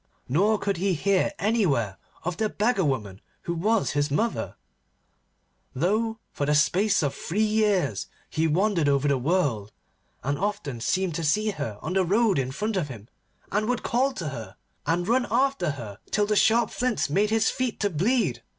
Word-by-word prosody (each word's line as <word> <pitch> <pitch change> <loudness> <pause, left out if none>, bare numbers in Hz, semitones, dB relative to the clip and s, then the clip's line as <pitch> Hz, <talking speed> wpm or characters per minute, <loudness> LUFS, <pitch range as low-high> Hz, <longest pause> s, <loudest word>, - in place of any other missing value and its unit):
Nor 200 - +3
could 200 -2 -1
he 190 +1 +1
hear 190 +4 +2
anywhere 165 - +1 0.3
of 175 0 -3
the 220 -1 0
beggar 210 -1 +1
woman 105 - -2 0.2
who 170 - -2
was 210 +6 +1
his 145 +1 0
mother, 220 +11 -1 1.2
though 215 - 0
for 145 - -2
the 150 - +3
space 190 +6 +3
of 140 - 0
three 205 +6 -1
years 205 - +1 0.2
he 160 +1 0
wandered 170 -1 +2
over 140 0 +2
the 140 -2 +2
world, 125 - 0 0.5
and 140 +2 -1
often 150 - -3
seemed 185 +6 0
to 165 +1 -3
see 210 +8 +2
her 110 - -5
on - - -3
the 190 0 +3
road 200 0 +2
in 130 -1 -1
front 210 +8 -2
of 170 -6 0
him, 115 -5 -10 0.4
and 215 +3 0
would 250 -1 -1
call 260 +4 +1
to 165 -11 -4
her, 115 -5 -8 0.3
and 175 +3 +1
run 245 +2 +2
after 255 - +1
her 115 -8 -6
till 210 0 +2
the 210 0 0
sharp 220 +4 +3
flints 250 -3 0
made 200 +8 +1
his 220 0 +2
feet 255 -3 -2
to 205 -1 +1
bleed. 180 - +1
185 Hz, 180 wpm, -26 LUFS, 145-215 Hz, 1.2 s, Nor